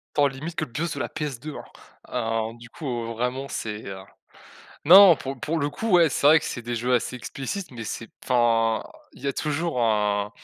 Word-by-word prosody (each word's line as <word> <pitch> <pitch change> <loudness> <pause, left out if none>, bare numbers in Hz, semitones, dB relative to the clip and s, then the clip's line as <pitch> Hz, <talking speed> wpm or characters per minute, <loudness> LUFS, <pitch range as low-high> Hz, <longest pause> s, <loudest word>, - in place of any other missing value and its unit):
Tant 145 -1 +4
limite 145 +5 -5
que - - 0
le 125 - -17
bus 165 +5 -2
de - - -6
la - - -1
PS2, 150 -1 -5 0.5
hein, 115 -2 -1
heu, - - -14
du 115 0 -13
coup, 120 -3 -4
vraiment, 125 +4 -2
c'est, 110 -3 -5
heu, 95 -1 -6 0.9
non, 185 +1 +9
pour 135 -1 -6
pour 160 +5 -1
le 145 -1 -1
coup, 220 +9 -3
ouais, 170 -3 +6
c'est - - +1
vrai 155 +2 +8
que - - -8
c'est - - -4
des 120 +1 -4
jeux 120 +2 -1
assez 125 +1 0
explicites 155 +9 -5
mais 115 -3 -7
c'est 115 +1 -6
enfin, 115 -3 +2 0.3
il - - -16
y - - -4
a 140 - +1
toujours 155 -1 -2
un 105 -2 +1
125 Hz, 215 wpm, -25 LUFS, 115-150 Hz, 0.9 s, non